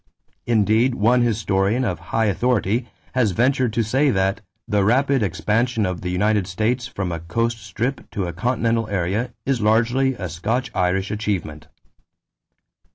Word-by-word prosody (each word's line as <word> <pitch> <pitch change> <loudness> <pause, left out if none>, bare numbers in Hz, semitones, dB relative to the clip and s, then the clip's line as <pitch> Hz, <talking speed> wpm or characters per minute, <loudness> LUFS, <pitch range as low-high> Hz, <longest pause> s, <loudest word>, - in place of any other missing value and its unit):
Indeed 115 +2 +3
one 120 +4 +3
historian 110 +1 +1
of 90 -8 -2
high 115 - +1
authority 115 +2 0 0.2
has 120 -7 +2
ventured 125 +2 +2
to 115 - +1
say 135 +7 +2
that 95 -1 0 0.3
"the 105 -3 +2
rapid 135 +5 +2
expansion 110 +4 0
of 90 -2 -3
the 90 - -3
United 100 +1 +1
States 115 +6 -1
from 95 -9 -4
a 85 - -3
coast 115 +8 -1
strip 130 +5 -3
to 100 - -3
a 85 - -4
continental 115 +2 0
area 100 +6 -1
is 130 -3 0
largely 120 +5 +2
a 95 -5 -5
Scotch 115 +10 -2
Irish 95 +2 0
achievement." 90 -8 -3
110 Hz, 150 wpm, -22 LUFS, 95-120 Hz, 0.3 s, Indeed